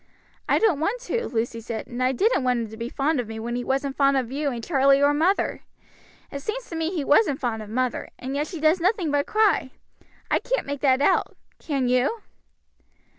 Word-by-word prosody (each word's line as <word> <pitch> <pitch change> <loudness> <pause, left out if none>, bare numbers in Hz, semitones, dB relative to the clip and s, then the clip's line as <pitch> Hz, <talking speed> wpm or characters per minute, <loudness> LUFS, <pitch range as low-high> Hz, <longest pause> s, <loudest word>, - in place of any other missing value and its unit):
"I - - +4
don't 405 -10 +2
want 405 +10 -1
to," 470 -2 -2
Lucy 230 -1 -2
said, 225 -1 -5
"and 245 +1 -6
I 255 +1 +3
didn't 395 - +1
want 250 -1 +1
him 225 -2 -4
to - - -8
be 230 +1 -4
fond 280 +2 0
of 240 - -3
me 220 0 -6
when 235 +2 -4
he 245 - -2
wasn't 270 +1 -1
fond 275 -1 +3
of 250 -2 -2
you 285 +1 -1
and 235 -3 -5
Charlie 275 -2 +4
or 285 +1 +4
mother. 340 +7 +1 0.7
It 280 - -5
seems 475 - -4
to - - -4
me 325 0 -1
he 340 -5 -2
wasn't 290 0 +3
fond 230 -4 -2
of 210 - -9
mother, 250 +2 -2
and 265 +2 -5
yet 295 +2 -1
she 345 - -7
does 315 +3 +3
nothing 365 -4 +1
but 285 0 +1
cry; 425 -10 +2 0.6
I - - +3
can't - - -2
make 285 -1 -5
that 265 -1 +3
out, - - +1 0.2
can 275 -5 -1
you?" 255 - +1
275 Hz, 225 wpm, -24 LUFS, 250-325 Hz, 0.7 s, I